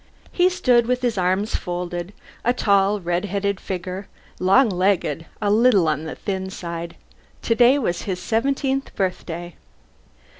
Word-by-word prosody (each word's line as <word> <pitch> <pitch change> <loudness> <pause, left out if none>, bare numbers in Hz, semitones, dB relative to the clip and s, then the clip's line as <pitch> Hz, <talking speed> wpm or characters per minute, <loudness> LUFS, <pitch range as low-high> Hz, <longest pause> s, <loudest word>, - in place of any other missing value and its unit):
He 360 0 +3
stood 245 -10 +3
with 250 0 0
his 240 -2 +1
arms 190 +3 0
folded, 175 0 -4 0.3
a 245 - +2
tall 200 -3 +2
red 175 +1 -1
headed 200 0 -1
figure, 185 +1 -5 0.3
long 195 +8 +5
legged, 185 -3 0
a 205 -2 +1
little 215 -5 +4
on 155 0 -1
the 160 - -5
thin 190 -1 -4
side. 170 -2 -6 0.5
Today 240 +4 +4
was 175 -11 -1
his 185 -3 -3
seventeenth 270 +5 -1
birthday. 175 -2 -3
195 Hz, 140 wpm, -22 LUFS, 180-235 Hz, 0.5 s, long